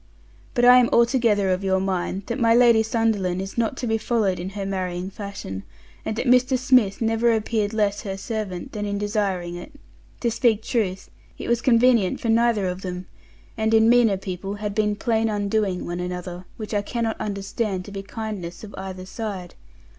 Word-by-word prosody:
But 245 - +3
I 250 0 +9
am 245 - +3
altogether 235 -5 +3
of 185 +1 -1
your 190 -1 +2
mind, 190 0 -2
that 235 - -3
my 230 -1 +4
Lady 235 -2 +6
Sunderland 220 -5 0
is 195 +1 -5
not 235 +2 0
to - - -3
be 225 -1 0
followed 215 -6 0
in 180 +2 -4
her 200 - -3
marrying 185 -1 -3
fashion, 200 - -6 0.4
and 220 - -3
that 240 - -2
Mr. 255 +1 +4
Smith 250 -6 +3
never 225 +1 +2
appear'd 220 -1 0
less 210 -2 0
her 195 -2 -5
servant 200 -5 -4
than 210 - -4
in 200 0 -2
desiring 200 -4 -1
it; 175 +12 -9 0.5
to 235 - +1
speak 225 -2 +2
truth, 195 -6 -2 0.3
it - - -6
was 235 0 +1
convenient 235 -5 +4
for 230 - -2
neither 230 -3 +3
of 180 0 -3
them, 180 -1 -5 0.5
and 220 0 +1
in 220 +1 +5
meaner 235 -5 +5
people 195 +1 -5
had 205 0 -4
been 210 0 +1
plain 225 +1 0
undoing 205 -2 -1
one 175 +1 -4
another, 180 0 -5
which 215 -1 -6
I 205 - +2
cannot 230 +1 -3
understand 200 -1 -3
to 205 - -10
be 195 -1 -5
kindness 200 -4 -6
of 210 - -9
either 185 -1 -6
side. 190 -3 -6
210 Hz, 190 wpm, -23 LUFS, 190-230 Hz, 0.5 s, I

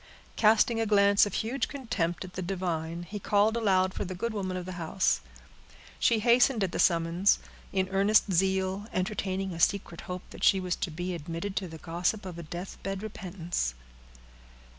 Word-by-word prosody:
Casting 225 +1 +4
a 225 - 0
glance 200 0 +5
of - - -5
huge 245 +5 -1
contempt 200 - -2
at 185 - -12
the 185 - -4
divine, 175 -2 -3
he 205 +4 -6
called 205 +3 +2
aloud 190 -4 +2
for - - -3
the 185 -1 -5
good 230 +5 -2
woman 185 -3 -3
of 180 - -5
the 185 - -6
house. 175 +4 +1 0.8
She 230 - +4
hastened 235 0 +4
at 185 - -1
the - - -3
summons, 170 +3 +3 0.3
with 190 -1 +1
earnest 200 +1 +3
zeal, 190 +2 +1
entertaining 190 -1 -2
a 165 - -7
secret 175 -1 +1
hope 180 0 -4
that - - -9
she 195 - +5
was 180 -1 -1
to 185 - -2
be 175 +3 -4
admitted 170 +4 -5
to 190 - -1
the 160 -1 -9
gossip 175 +6 -2
of 175 -2 -7
a - - -4
death 175 +4 -7
bed 195 +1 -4
repentance. 175 - -3
190 Hz, 185 wpm, -29 LUFS, 175-205 Hz, 0.8 s, glance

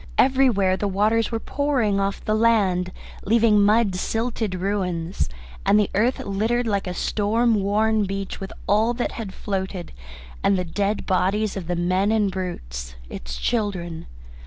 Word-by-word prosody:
Everywhere 245 -8 +3
the 205 - -1
waters 215 +4 +1
were 225 - -1
pouring 250 -8 0
off 195 0 -2
the 215 - +1
land, 205 -5 +2 0.3
leaving 220 -1 +4
mud 210 0 +4
silted 225 0 -2
ruins, 180 - -2 0.3
and 210 - +4
the 205 - +1
earth 235 +6 +2
littered 225 +5 0
like 200 -4 -1
a 180 - -2
storm 225 +5 +1
worn 210 +1 +2
beach 195 0 -4
with 195 - -6
all 220 +4 +2
that 240 - -2
had 220 -5 -6
floated, 190 -2 -4 0.5
and 195 - +3
the 180 - -1
dead 200 +4 -1
bodies 195 +3 +1
of 185 -4 -5
the 175 - -1
men 185 +4 +1
and 210 -3 +2
brutes, 60 - -5 0.2
its - - -6
children. 180 - -2
200 Hz, 155 wpm, -23 LUFS, 185-220 Hz, 0.5 s, leaving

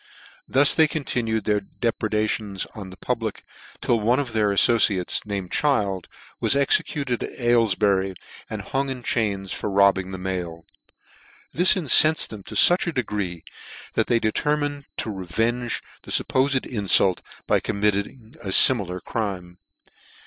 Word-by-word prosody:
Thus 135 +2 +5
they 160 -1 +4
continued 120 -7 -2
their 105 -1 0
depredations 105 -2 -3
on 100 -4 -9
the 95 - -13
public, 115 -4 -4 0.4
till 120 - +1
one 120 +5 +1
'of 130 -5 -4
their 105 -2 +1
alibciates, 100 -3 +3
named 100 -3 -5
Child, 100 -11 0 0.3
was - - +2
executed 140 -2 0
at - - -7
Aylef 120 -5 +2
bury, 95 -2 0 0.3
and - - -6
hung 135 +1 -2
in 130 -2 -6
chains, 100 -6 -2
for - - -3
robbing 100 -1 +2
the 95 - -6
mail. 90 -3 -5 0.9
This 180 +5 +5
incenfed' 155 -2 +5
them 105 -2 -9
to - - -9
fuch 175 +1 +5
a - - 0
degree, 105 - -4 0.5
that - - 0
they 120 - +2
determined 145 +5 -2
to 115 - -3
revenge 110 +6 -2 0.2
the - - -15
fuppofed 130 0 +1
infult 100 -5 +2 0.3
by - - +2
committing 105 +3 -3
a 105 - -9
fimilar 95 -5 +5
crime. 95 -5 -5
110 Hz, 140 wpm, -23 LUFS, 95-130 Hz, 0.9 s, Thus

